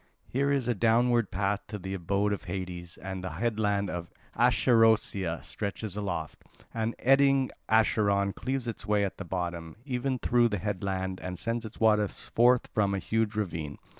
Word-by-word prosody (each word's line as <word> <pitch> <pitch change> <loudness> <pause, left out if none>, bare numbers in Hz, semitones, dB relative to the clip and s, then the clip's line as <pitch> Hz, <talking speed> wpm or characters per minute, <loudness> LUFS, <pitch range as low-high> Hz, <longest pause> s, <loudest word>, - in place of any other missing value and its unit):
Here 140 +2 0
is 135 -4 +1
a 120 - +2
downward 115 +1 +3
path 100 +2 -1
to 105 - -5
the 95 0 -6
abode 100 +3 0
of 100 - -5
Hades, 90 -1 -5
and 95 0 -6
the 90 -4 -4
headland 105 0 0
of 85 0 -5 0.3
Acherusia 110 -7 +3
stretches 100 -1 -4
aloft, 90 -6 -4 0.3
and 115 0 -2
eddying 135 0 +4 0.2
Acheron 100 -3 +3
cleaves 130 -1 -3
its 115 - -5
way 105 -1 +3
at 95 - -6
the - - -5
bottom, 85 -3 -4
even 130 0 -1
through 120 -1 +3
the 105 -3 -2
headland, 95 -1 -3
and 90 0 -5
sends 115 +3 -2
its 110 - -14
waters 105 -2 +2
forth 125 +1 +4
from 100 -2 +2
a - - 0
huge 110 +2 -1
ravine. 85 -8 -3
105 Hz, 165 wpm, -29 LUFS, 95-115 Hz, 0.3 s, eddying